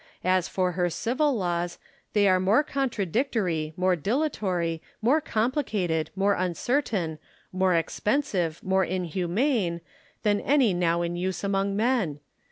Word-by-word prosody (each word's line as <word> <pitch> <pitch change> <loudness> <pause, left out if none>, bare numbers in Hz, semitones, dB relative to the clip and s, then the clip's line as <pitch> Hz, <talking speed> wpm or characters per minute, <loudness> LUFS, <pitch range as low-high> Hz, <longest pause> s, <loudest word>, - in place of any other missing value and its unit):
As 185 -1 +2
for 185 -1 0
her 175 0 0
civil 260 - 0
laws, 175 -3 -2 0.4
they 205 -1 +4
are 185 -1 +4
more 200 +10 +3
contradictory, 215 - -1
more 185 0 +3
dilatory, 180 - -1 0.2
more 260 +8 +3
complicated, 215 - -1
more 200 +1 +2
uncertain, 185 - -1 0.3
more 185 -1 +2
expensive, 175 - -1
more 190 0 +2
in 185 +1 -2
humane, 180 - 0 0.4
than 205 -1 +2
any 265 -8 +3
now 170 -1 +1
in 170 0 -2
use 185 +2 -2
among 195 0 0
men. 215 - +1
190 Hz, 130 wpm, -26 LUFS, 175-225 Hz, 0.4 s, they